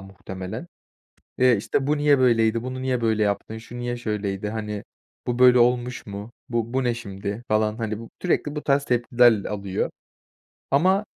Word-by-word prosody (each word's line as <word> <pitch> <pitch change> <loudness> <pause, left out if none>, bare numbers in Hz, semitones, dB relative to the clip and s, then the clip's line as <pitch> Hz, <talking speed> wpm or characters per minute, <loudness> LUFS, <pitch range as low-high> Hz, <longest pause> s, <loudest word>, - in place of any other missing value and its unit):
muhtemelen, 95 - -7 0.7
eee, 125 -3 +5
işte, 135 +6 -1
"Bu 150 +1 +2
niye 145 -1 +4
böyleydi? 115 -2 +3
Bunu 130 0 -5
niye 130 -2 0
böyle 110 -2 +2
yaptın? 105 +2 -2
Şu 115 +2 -10
niye 120 0 -2
şöyleydi, 105 -3 -3
hani, 105 -1 -4 0.4
bu 120 0 -1
böyle 125 -1 +7
olmuş 125 +1 +1
mu? 100 +2 -7 0.2
Bu 115 0 -2
bu 130 0 +1
ne 120 -1 +1
şimdi?" 100 -1 -6
falan, 110 0 +1
hani, 110 -2 -3
bu 115 - -10
sürekli 155 -4 0
bu 150 - -4
tarz 140 0 +2
tepkiler 120 -3 +3
alıyor. 100 -2 -2 0.8
Ama 185 +9 +3
120 Hz, 165 wpm, -24 LUFS, 105-125 Hz, 0.8 s, böyle